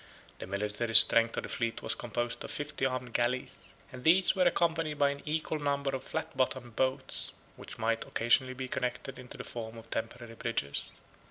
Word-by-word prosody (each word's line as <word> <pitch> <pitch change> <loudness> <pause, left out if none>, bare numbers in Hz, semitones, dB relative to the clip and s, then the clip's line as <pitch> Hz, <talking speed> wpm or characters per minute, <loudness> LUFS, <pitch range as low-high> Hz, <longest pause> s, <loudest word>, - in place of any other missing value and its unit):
The - - -6
military 105 +4 -2
strength 115 0 +7
of - - -1
the - - -6
fleet 115 -1 -2
was - - +3
composed 120 +1 -3
of - - -7
fifty 145 -2 -1
armed 125 -2 -4
galleys; 125 +2 -1 0.2
and 125 -1 -9
these 180 +4 +5
were 185 -1 +3
accompanied 165 -2 +1
by 140 -1 +4
an 140 0 -7
equal 155 0 -1
number 140 -1 0
of 130 - -5
flat - - -4
bottomed 130 -2 -1
boats, 130 0 -1 0.2
which - - -10
might 115 0 0
occasionally 130 +3 +2
be 130 0 -4
connected 125 +1 -3
into 125 -1 -9
the - - -5
form 115 -1 -6
of 115 0 -12
temporary 115 +1 -4
bridges. 115 -12 -2
125 Hz, 185 wpm, -31 LUFS, 115-140 Hz, 0.2 s, strength